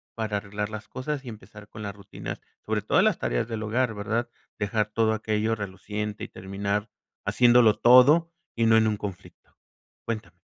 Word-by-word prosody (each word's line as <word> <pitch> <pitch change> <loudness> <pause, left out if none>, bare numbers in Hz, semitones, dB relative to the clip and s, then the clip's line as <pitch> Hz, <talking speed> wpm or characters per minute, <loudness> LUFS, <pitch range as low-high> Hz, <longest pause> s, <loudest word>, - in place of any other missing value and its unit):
para 110 -2 -2
arreglar 105 +1 -4
las 110 0 -7
cosas 135 +2 -4
y - - -6
empezar 105 -1 -12
con 110 - -10
las 100 -1 -4
rutinas? 100 -1 -8 0.2
Sobre - - 0
todas - - +3
las - - +3
tareas - - -1
del 110 -2 -4
hogar, 115 +2 0
verdad, 115 +3 -2 0.3
dejar 105 +1 0
todo 110 -1 +2
aquello 110 +1 0
reluciente 105 +1 -5
y - - -4
terminar 100 +2 -3 0.4
haciéndolo 120 -3 +5
todo, 145 +8 +6 0.2
y 115 -1 +2
no 110 0 +6
en 110 0 +4
un 105 - 0
conflicto. 100 -3 -9 0.5
Cuéntame. 110 -2 -5
110 Hz, 170 wpm, -26 LUFS, 105-115 Hz, 0.5 s, todo